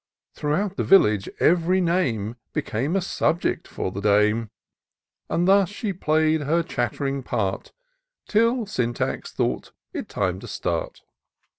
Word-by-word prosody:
Throughout 190 +7 -1
the - - +1
village, 105 - +4
ev'ry 175 +2 +3
name 125 - 0 0.2
Became 135 - -1
a 195 - +2
subject 175 -1 0
for 95 - -4
the 100 - -5
dame; 105 +2 +3 0.8
And 175 +1 +1
thus 195 -1 +5
she 205 0 -3
play'd 155 -2 +2
her 165 +4 +1
chatt'ring 135 +2 -2
part, 100 -6 -2 0.6
Till 230 +2 +2
Syntax 120 - -2
thought - - -2 0.2
it - - -5
time 90 0 -1
to - - -10
start. - - -3
155 Hz, 130 wpm, -24 LUFS, 110-185 Hz, 0.8 s, thus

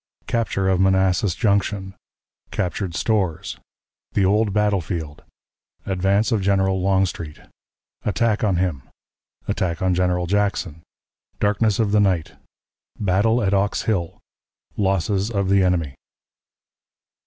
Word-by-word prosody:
Capture 110 -5 -1
of 95 -1 +2
Manassas 95 -1 +2
Junction. 100 -3 0 0.6
Captured 90 -1 -3
Stores. 95 -5 -1 0.5
The 100 - +2
Old 105 +2 +2
Battle 105 -1 +1
Field. 80 -2 -6 0.6
Advance 95 +4 +1
of 110 -3 +1
General 95 -1 +1
Longstreet. 90 -5 0 0.6
Attack 110 +1 0
on 100 -4 +2
him. 85 -6 -1 0.7
Attack 85 -3 -1
on 95 -1 +2
General 90 0 +1
Jackson. 100 -4 -1 0.6
Darkness 105 0 +2
of 110 -3 +1
the 105 - +4
Night. 95 -6 +1 0.7
Battle 105 +4 +2
at 95 0 +1
Ox 100 +1 +1
Hill. 90 -7 -1 0.6
Losses 95 +1 0
of 100 -4 -1
the 100 0 +4
Enemy. 85 -6 +1
95 Hz, 115 wpm, -22 LUFS, 90-105 Hz, 0.7 s, the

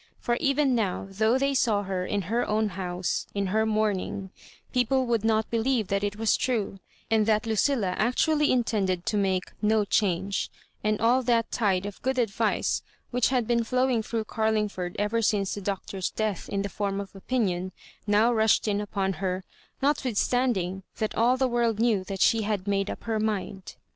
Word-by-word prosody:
For 240 - 0
even 275 -1 +2
now, 210 -7 0
though 220 +5 +2
they 275 +1 +1
saw 220 -6 +2
her 185 -2 -3
in 205 -1 -1
her 230 +7 0
own 215 0 +1
house, 180 -1 -3
In 200 0 0
her 220 0 +2
mourning, 205 -3 -1 0.4
people 255 +1 +2
would 230 -3 0
not 220 -1 +1
believe 230 -2 +1
that 200 0 0
it 205 0 -1
was 220 0 +2
true, 215 -6 -1 0.3
and 220 -1 +3
that 215 0 +2
Lucilla 225 -1 +1
actually 295 +6 +2
intend 225 -6 +1
ed 180 -1 -1
to 215 - 0
make 190 -2 0
" - - -34
no 215 -2 +3
change 195 -1 0 0.2
;" - - -39
and 215 0 +1
all 240 +4 +3
that 235 -2 +1
tide 195 -4 +1
of 205 -1 -7
good 260 +1 -1
advice 225 -2 0 0.3
which 245 -1 +2
had 250 -3 +1
been 235 0 +1
flowing 255 0 +1
through 225 0 -3
Carling 220 -1 0
ford 180 -2 -5
ever 210 +3 0
since 205 -3 +1
the 205 - -5
Doctor's 195 -1 -3
death 215 -4 -3
in 200 0 -1
the - - -2
form 200 0 -2
of 200 0 -7
opinion, 190 -4 -1 0.4
now 215 +4 +4
rushed 220 -1 +3
in 205 -1 +1
upon 195 -2 -1
her, 185 0 -1 0.4
notwitlistand 255 -3 +1
mg 185 +1 -3 0.2
that 215 - -1
all 245 +3 +3
the 260 0 +2
world 235 -3 +1
knew 225 -5 +2
tliat 195 0 -5
she 225 -1 +4
had 210 -2 -2
made 195 0 0
up - - -6
her 225 -1 -1
mind. 200 -3 -3
215 Hz, 195 wpm, -27 LUFS, 195-235 Hz, 0.4 s, now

